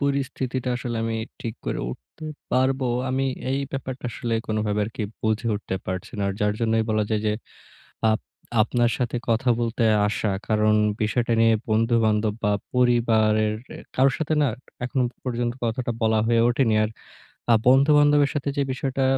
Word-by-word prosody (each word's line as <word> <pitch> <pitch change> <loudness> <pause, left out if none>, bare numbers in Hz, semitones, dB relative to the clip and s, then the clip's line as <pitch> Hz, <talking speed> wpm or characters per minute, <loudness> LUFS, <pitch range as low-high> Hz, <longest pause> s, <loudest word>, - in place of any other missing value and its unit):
পরিস্থিতিটা 135 -2 -1
আসলে 120 -1 -4
আমি 115 0 -1 0.2
ঠিক 115 -1 -4
করে - - -1
উঠতে 155 - -11 0.3
পারবো? 130 +1 +2 0.2
আমি 135 +1 0 0.3
এই 135 - +1
ব্যাপারটা 130 -1 -5
আসলে 120 -1 -3
কোনোভাবে 105 -1 0
আরকি 110 0 -5 0.2
বুঝে 110 +1 0
উঠতে 100 -2 -3
পারছি 95 0 -4
না। - - 0
আর - - -1
যার 105 0 +2
জন্যই 115 -1 +2
বলা 110 -1 +2
যায় 110 -1 +1
যে 105 - +2 0.8
আপ 110 - +1 0.4
আপনার 120 +2 +2
সাথে 120 -1 -1
কথা 115 +3 +2
বলতে 115 0 0 0.2
আসা। 105 +1 -1 0.2
কারণ 110 0 +3 0.3
বিষয়টা 115 +2 +1
নিয়ে 115 0 +5 0.2
বন্ধু-বান্ধব 110 -1 +2
বা 105 - +3 0.2
পরিবারের 110 -3 +3 0.4
কারো 135 +1 +4
সাথে 160 0 -1
না 145 - +3 0.4
এখনো 130 +1 0 0.2
পর্যন্ত 120 -1 -1
কথাটা 120 +1 -1
বলা 110 0 +3
হয়ে 115 0 +3
ওঠেনি। 120 -3 +2
আর 110 - -1 0.6
আ - - +7
বন্ধুবান্ধবের 145 +2 +5
সাথে 145 -1 -2
যে - - +2
বিষয়টা 135 +1 -2
120 Hz, 155 wpm, -24 LUFS, 110-130 Hz, 0.8 s, আ